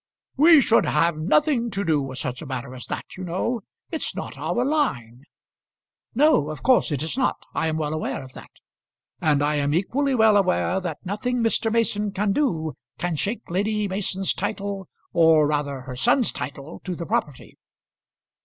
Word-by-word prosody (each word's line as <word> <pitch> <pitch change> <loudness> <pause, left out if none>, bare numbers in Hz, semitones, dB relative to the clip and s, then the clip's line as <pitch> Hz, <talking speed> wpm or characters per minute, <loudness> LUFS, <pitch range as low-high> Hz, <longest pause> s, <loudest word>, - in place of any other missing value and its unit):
"We 310 +1 +7
should 230 -2 +3
have 165 +2 +2
nothing 240 - +2
to 200 -1 -2
do 155 -4 +2
with 130 -1 -6
such 125 -1 -3
a 160 - -8
matter 130 0 -5
as 125 - -7
that, - - -6
you 185 - -6
know. 190 +7 -2 0.3
It's 320 - -2
not - - -6
our 245 +1 -1
line." 135 - -1 0.9
"No, 265 - +4
of 155 - -7
course 255 -9 +4
it 145 0 -1
is 160 - -3
not; 255 - 0
I - - 0
am 160 0 -1
well 155 -1 -2
aware 155 -3 -3
of 130 -1 -13
that. - - -12 0.7
And 145 -2 +2
I 150 +1 +1
am 145 +1 +1
equally 265 +10 +1
well 220 -3 +5
aware 185 -1 +1
that 175 -2 -6
nothing 230 +6 -1
Mr. 225 0 +2
Mason 210 -2 +1
can 200 +1 0
do 160 - 0 0.2
can 175 -2 -2
shake 205 +4 -3
Lady 210 +3 0
Mason's 195 0 -1
title, 200 -1 -4 0.2
or 160 -2 +5
rather 145 -2 -1
her 125 0 -8
son's 245 - +2
title, 140 +4 -7
to 185 -2 -4
the 170 - -5
property. 145 -3 -3
185 Hz, 180 wpm, -24 LUFS, 150-225 Hz, 0.9 s, We